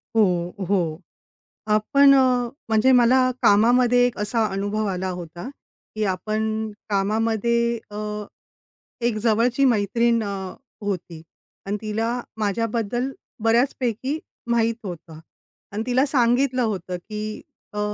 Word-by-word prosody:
हो, 180 -5 +2
हो. 170 -5 0 0.7
आपण 275 +6 +5
अ, 250 -2 +3 0.2
म्हणजे 220 +4 +4
मला 255 +2 +4
कामामध्ये 245 +4 +5
एक 245 - -2
असा 220 +2 +1
अनुभव 205 +2 -1
आला 185 -1 -2
होता, 175 +7 -8 0.5
की 215 - -1
आपण 215 +3 -2 0.2
कामामध्ये 225 +3 +1
अ, 205 - -7 1.1
एक 235 -3 +1
जवळची 235 +4 +3
मैत्रीण 230 0 +2
अ, 195 -2 -5 0.3
होती 175 -4 -4 0.4
आणि 205 +1 -2
तिला 225 +3 -1 0.2
माझ्याबद्दल 230 +4 -1 0.3
बऱ्याचपैकी 245 +3 +1 0.3
माहीत 230 -1 +2
होतं 170 -4 -8 0.5
आणि 210 +2 -3
तिला 255 +2 +2
सांगितलं 255 -1 +2
होतं, 185 -4 -3
की 215 +3 -6 0.3
अ, 210 - -4
220 Hz, 110 wpm, -23 LUFS, 200-240 Hz, 1.1 s, आपण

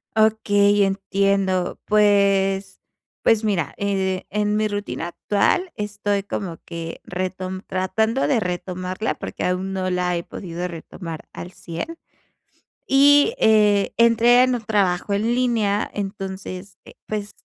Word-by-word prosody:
Okey, 205 -2 +3
entiendo. 195 -1 0
Pues 200 -2 +2 0.4
pues, 225 -1 +3
mira, 175 -9 0
eh, 190 -2 -1
en 210 0 0
mi 215 0 +1
rutina 205 -4 -4
actual 210 - 0
estoy 205 -1 -2
como 185 -4 -5
que 165 -1 -7
retom 185 +1 -4
tratando 220 +7 0
de 270 -5 +2
retomarla, 185 +2 -3
porque - - -6
aún 185 +1 -1
no 185 -1 -1
la 180 -1 0
he 170 - -3
podido 175 -2 -6
retomar 165 -1 -8
al 180 - -8
100 180 - -7 0.9
y, 285 +7 +5
eh, 210 -2 +3
entre 235 +2 +5
en 255 -1 +2
un 235 - -4
trabajo 200 -3 0
en 200 +2 0
línea, 225 -5 +1
entonces, 195 -1 -6
eh, - - -13
pues, 210 -1 -5
200 Hz, 125 wpm, -22 LUFS, 185-215 Hz, 0.9 s, y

